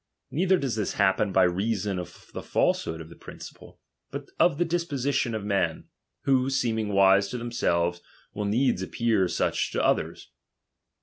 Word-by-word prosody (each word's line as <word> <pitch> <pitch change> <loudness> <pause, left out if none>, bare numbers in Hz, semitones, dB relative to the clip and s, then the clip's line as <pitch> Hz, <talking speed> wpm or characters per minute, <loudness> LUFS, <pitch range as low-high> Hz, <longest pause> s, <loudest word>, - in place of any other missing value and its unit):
Neither 185 +4 +3
dolh 135 -8 -2
this 105 - -1
happen 100 0 +2
by 95 0 +4
reason 100 +1 0
of 90 - -6
tiie - - -11
falsehood 80 0 0
of 80 - -10
the 85 - -12
principle, - - -12 0.3
but - - -7
of 170 -5 +4
the 175 - +2
disposition 140 -8 -1
of 105 -2 -4
men, 95 -6 -1 0.4
wbo, 130 -1 +3
seeming 115 -5 0
wise 100 0 +5
to 125 - -5
themselves, 90 -8 0 0.3
will 105 - -3
needs 120 0 +1
appear 105 0 +1
such - - 0
to - - 0
all - - +5
others. - - -4
105 Hz, 165 wpm, -26 LUFS, 95-130 Hz, 0.4 s, wise